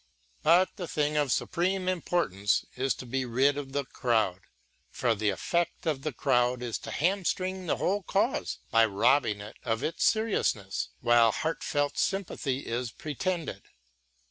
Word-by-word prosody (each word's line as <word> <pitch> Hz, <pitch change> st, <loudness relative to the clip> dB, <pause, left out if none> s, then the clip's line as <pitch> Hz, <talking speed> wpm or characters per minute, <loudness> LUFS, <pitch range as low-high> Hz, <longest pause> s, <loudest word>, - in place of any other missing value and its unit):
But 175 Hz, +6 st, +4 dB
the 180 Hz, -4 st, -4 dB
thing 150 Hz, -1 st, 0 dB
of 145 Hz, -3 st, +1 dB
supreme 185 Hz, +1 st, 0 dB
importance 165 Hz, -, 0 dB
is 130 Hz, +1 st, 0 dB
to -, -, -8 dB
be 130 Hz, +2 st, -1 dB
rid 130 Hz, +4 st, +2 dB
of 140 Hz, -2 st, -5 dB
the 140 Hz, 0 st, -1 dB
crowd; 110 Hz, -8 st, 0 dB, 0.5 s
for 120 Hz, -2 st, +1 dB
the 105 Hz, -1 st, 0 dB
effect 170 Hz, -, -1 dB
of 150 Hz, -5 st, 0 dB
the 155 Hz, -, -2 dB
crowd 125 Hz, -1 st, +1 dB
is 120 Hz, -2 st, -3 dB
to -, -, -8 dB
hamstring 185 Hz, +1 st, -1 dB
the -, -, +1 dB
whole 200 Hz, +3 st, 0 dB
cause 180 Hz, -, 0 dB
by 115 Hz, 0 st, +6 dB
robbing 105 Hz, +1 st, +2 dB
it 105 Hz, -, -10 dB
of 115 Hz, -2 st, -2 dB
its 165 Hz, -, -1 dB
seriousness 205 Hz, -, +1 dB
while 120 Hz, -1 st, +5 dB
heartfelt 145 Hz, 0 st, -1 dB
sympathy 160 Hz, -8 st, -1 dB
is 120 Hz, +1 st, -2 dB
pretended. 165 Hz, +7 st, -3 dB
140 Hz, 150 wpm, -29 LUFS, 120-175 Hz, 0.5 s, by